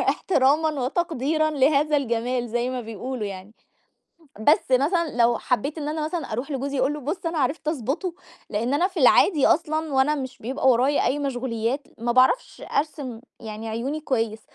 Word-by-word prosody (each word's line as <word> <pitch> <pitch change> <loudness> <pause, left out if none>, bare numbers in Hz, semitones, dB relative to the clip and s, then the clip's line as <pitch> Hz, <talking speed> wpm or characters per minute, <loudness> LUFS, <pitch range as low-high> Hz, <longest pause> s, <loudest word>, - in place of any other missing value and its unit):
إحترامًا 300 -1 +2
وتقديرًا 310 +1 0
لهذا 295 +1 +3
الجمال 240 -2 -1
زي 240 +2 -1
ما 255 -1 -3
بيقولوا 225 +1 -5
يعني، 195 +1 -8 0.9
بس 290 +4 +3
مثلًا 300 +4 +2
لو 235 -1 +3
حبيت 275 +6 -1
إن 295 -1 -3
أنا 305 0 -2
مثلًا 315 -5 -4
اروح 245 +7 -3
لجوزي 275 0 -2
أقول 270 +3 +2
له 300 - -6
بُص 310 +6 -4
أنا 330 -1 -1
عرفت 290 +3 -1
أضبطه 310 - -2 0.4
لإن 230 +6 -1
أنا 350 +6 +2
في 375 -4 -5
العادي 285 +4 +5
أصلًا 315 0 +1
وأنا 265 +3 +3
مش 260 -3 -6
بيبقى 265 +4 -1
ورايا 260 +3 +3
أي 265 +4 +1
مشغوليات 255 -1 -2
ما 235 +1 -1
باعرفش 255 - +2
أرسم 280 -6 -2 0.2
يعني 220 0 -7
عيوني 250 +8 -3
كويس، 225 -6 -1
270 Hz, 165 wpm, -24 LUFS, 240-305 Hz, 0.9 s, العادي